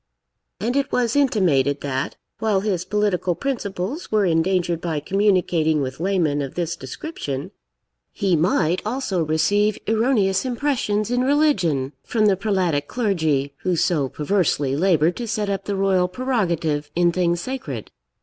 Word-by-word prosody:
And 235 +6 -1
it 280 -1 0
was 240 -1 +1
intimated, 170 - +2
that, 135 -1 -3 0.2
while 215 -3 +1
his 190 -4 -1
political 190 -3 0
principles 230 - -4
were 215 -2 +3
endangered 170 0 +1
by 160 -3 -2
communicating 180 -3 +2
with 130 -1 -4
laymen 170 -6 +1
of 135 -2 -5
this 170 -1 -2
description, 135 - -6 0.6
he 190 -3 +1
might 170 +1 +1
also 215 -6 -1
receive 200 +7 +2
erroneous 220 -4 +2
impressions 240 -5 -1
in 245 0 +2
religion 190 - +2
from 220 -2 +1
the 200 -2 +4
prelatic 185 -8 0
clergy, 160 - 0
who 185 -1 -1
so 155 -4 +1
perversely 150 -4 0
laboured 170 0 +2
to 240 - -4
set 210 -2 -1
up 195 - -3
the 200 - -2
royal 190 -2 +2
prerogative 170 - -1
in 175 0 +3
things 175 -1 +1
sacred. 155 - -5
185 Hz, 140 wpm, -22 LUFS, 155-215 Hz, 0.6 s, the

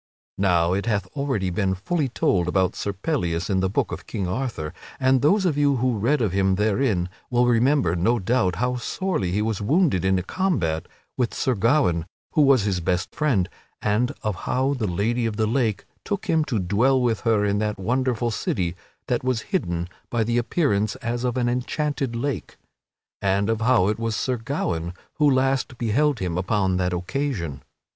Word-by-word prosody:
Now 90 -3 +3
it 100 +4 -1
hath 100 -4 +1
already 135 -10 -1
been 95 +1 0
very 90 - -15
fully 160 -6 0
told 90 -6 +1
about 95 0 +1
Sir 100 - -2
Pellias 95 - -2
in 95 - +2
the 95 0 +1
Book 95 - 0
of - - -7
King 95 -3 -3
Arthur, 90 - -3 0.3
and 130 -1 +3
those 190 +7 +3
of 150 -5 +1
you 145 -1 +3
who 125 -3 0
read 125 +5 +2
of 105 - +1
him 95 0 +2
therein 105 -2 +1 0.2
will 125 0 +3
remember, 120 - +3
no 115 +8 +2
doubt, 95 -3 +1
how 125 +6 0
sorely 125 - -2
he 105 +3 0
was 110 -2 -2
wounded 140 - +2
in 95 0 +3
a 90 - -1
combat 90 - -1 0.3
with 125 -3 0
Sir 130 - +1
Gawaine, 100 - +2 0.2
who 155 - +3
was 135 -6 +5
his 100 -3 0
best 90 0 -1
friend, 125 - +1 0.3
and 110 +4 +1
of 110 - 0 0.2
how 135 +2 +1
the 120 -6 -2
Lady 115 +6 0
of 105 -2 -4
the 110 - +2
Lake 110 -2 0 0.2
took 205 -2 -3
him 160 -1 +2
to 120 - -1
dwell 110 +8 +2
with 120 -4 +1
her 110 -3 +2
in 100 0 +1
that 105 -1 -1
wonderful 120 +3 0
city 90 -4 -1 0.3
that 125 -1 -1
was 130 -3 0
hidden 85 -1 -1 0.2
by 120 -2 +1
the 120 +2 +1
appearance 115 - 0
as 120 -2 -3
of 125 0 -1
an 120 -1 +1
enchanted 130 +1 -1
lake, 120 - -3 0.6
and 100 +2 +1
of 115 0 -2
how 115 -5 +4
it 105 +1 0
was 115 -1 -1
Sir 125 +2 -1
Gawaine 90 - -3 0.2
who 150 -1 +5
last 130 -1 +1
beheld 130 +5 +1
him 90 -3 -2
upon 95 -1 +1
that 90 0 0
occasion. 90 - -3
115 Hz, 190 wpm, -24 LUFS, 95-130 Hz, 0.6 s, was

